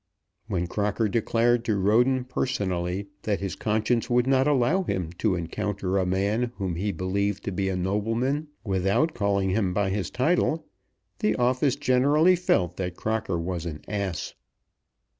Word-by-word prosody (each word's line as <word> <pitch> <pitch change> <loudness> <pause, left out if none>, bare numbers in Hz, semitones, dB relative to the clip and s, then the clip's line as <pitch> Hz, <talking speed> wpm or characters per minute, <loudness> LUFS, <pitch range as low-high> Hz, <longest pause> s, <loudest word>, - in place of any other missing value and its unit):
When 90 -5 -1
Crocker 105 +4 0
declared 115 +2 +2
to 110 -3 +1
Roden 120 +6 +3
personally 100 -7 -2
that 105 -2 -1
his 100 -1 -3
conscience 110 +3 0
would 125 0 +3
not 135 +1 +3
allow 145 +6 +3
him 95 - -2
to 105 -4 +2
encounter 95 +2 -2
a 95 - 0
man 105 +6 0
whom 95 -4 -3
he 100 +5 -1
believed 100 +2 -1
to - - -3
be 95 +1 -1
a 95 - -1
nobleman 115 - -1 0.2
without 100 - +1
calling 100 -2 +1
him 95 -3 0
by 100 -2 +1
his 95 -4 -2
title, 155 +3 +1 0.5
the 105 - +1
office 130 +2 +2
generally 145 +8 +4
felt 90 - +1
that 90 -2 -3
Crocker 110 -5 -1
was 85 0 -3
an 75 -2 -6
ass. 100 -6 -3
105 Hz, 155 wpm, -26 LUFS, 95-125 Hz, 0.5 s, generally